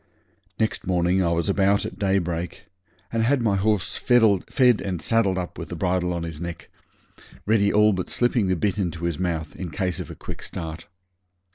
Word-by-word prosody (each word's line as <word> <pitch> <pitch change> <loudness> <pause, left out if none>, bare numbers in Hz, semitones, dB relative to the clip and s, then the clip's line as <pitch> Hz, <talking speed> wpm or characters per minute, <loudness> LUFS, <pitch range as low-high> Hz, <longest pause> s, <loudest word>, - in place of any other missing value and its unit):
Next 110 -4 -1
morning 90 +1 +2
I 85 - +2
was 85 +2 0
about 100 0 +2
at - - -7
daybreak 90 -4 -1 0.5
and 115 - +1
had 130 +5 +3
my 105 -3 +2
horse 100 -1 0
fed 120 -2 +4 0.6
and 95 -3 -3
saddled 100 -2 +2
up 90 -1 -5
with - - -6
the - - -5
bridle 90 0 0
on 85 -1 -2
his 80 -1 -6
neck, 85 -2 -7 0.7
ready 100 -1 +3
all 105 0 +5
but 90 -1 -3
slipping 120 -4 +1
the 95 - +2
bit 100 +3 -1
into 85 -3 -2
his 85 -3 -2
mouth, 85 -3 -2
in 90 - -5
case 90 +1 -2
of - - -6
a - - -8
quick - - -8
start. 80 0 -6
95 Hz, 185 wpm, -24 LUFS, 85-100 Hz, 0.7 s, all